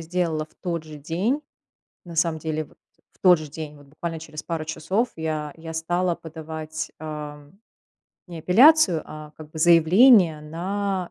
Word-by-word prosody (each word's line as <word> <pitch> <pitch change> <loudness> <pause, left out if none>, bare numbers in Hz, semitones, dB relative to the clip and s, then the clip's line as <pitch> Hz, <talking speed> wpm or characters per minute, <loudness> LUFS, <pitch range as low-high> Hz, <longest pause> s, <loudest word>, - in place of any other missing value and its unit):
сделала 165 -2 -1
в - - -31
тот 170 -3 -4
же 155 -1 -10
день, 185 - -1 0.6
на 170 -2 -10
самом 165 -1 +1
деле, 155 0 -3
вот - - -23 0.3
в - - -31
тот 180 -3 +6
же 155 - -8
день, 150 0 -8
вот 145 -1 -17
буквально 160 +3 -6
через 155 -1 -8
пару 165 -2 -4
часов 185 +9 -1
я 155 -2 -3
я 160 0 -8
стала 175 +2 0
подавать, 160 -1 -7
а, 150 -2 -7 0.8
не 175 -2 -8
апелляцию, 215 - +5
а 155 0 -10
как 155 -1 -12
бы 160 - -9
заявление 170 +2 +6
на 185 +4 -3
160 Hz, 160 wpm, -24 LUFS, 155-180 Hz, 0.8 s, тот